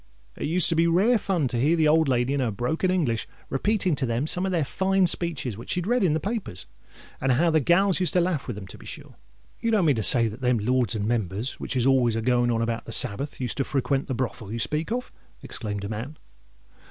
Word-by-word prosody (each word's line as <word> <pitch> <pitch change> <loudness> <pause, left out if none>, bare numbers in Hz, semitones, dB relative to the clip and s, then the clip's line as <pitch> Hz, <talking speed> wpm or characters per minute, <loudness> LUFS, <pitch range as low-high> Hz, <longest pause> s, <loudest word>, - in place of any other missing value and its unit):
It - - -4
used 170 +2 +3
to 165 - +1
be 165 +1 +3
rare 205 +8 +3
fun 180 -8 0
to 120 - -2
hear 150 +7 +3
the 160 -2 +3
old 160 0 +4
lady, 125 0 +1
in 140 - 0
her 125 -3 0
broken 125 - -1
English, 150 -12 0 0.2
repeating 185 +4 +1
to 135 - 0
them 115 +4 -1
some 180 +4 -1
of - - -2
their 165 -5 +1
fine 190 +5 +1
speeches, 165 - -1
which - - -10
she'd 180 -1 -1
read 245 +1 +1
in 170 -5 +3
the - - 0
newspapers; 200 - -4 0.6
and 130 -1 +2
how 165 +7 +2
the 160 - +4
gals 180 +6 +3
used 180 - 0
to 180 - +3
laugh 170 -5 -1
with 120 - -4
them, 100 -1 -8
to - - -12
be - - -14
sure!" - - -10 0.5
"You 230 - -1
don't 210 -6 +2
mean 145 -6 +3
to - - 0
say 115 +1 +5
that 110 +4 -8
them 125 -1 +2
Lords 120 0 0
and 105 -2 -2
Members, 110 +1 -2
which - - -4
is 125 -2 +1
always 130 -4 +3
a 115 - -1
going 120 0 +2
on 115 -1 +1
about 115 0 -3
the - - -8
Sabbath, 130 +5 -1
used 125 -3 -2
to 135 - +1
frequent 135 0 -1
the 130 - -2
brothel 120 -4 -4
you 115 - -3
speak 150 - -2
of?" 250 +1 -3 0.3
exclaimed 105 -3 -5
a 100 - -4
man. 120 +8 -6
135 Hz, 250 wpm, -25 LUFS, 120-175 Hz, 0.6 s, say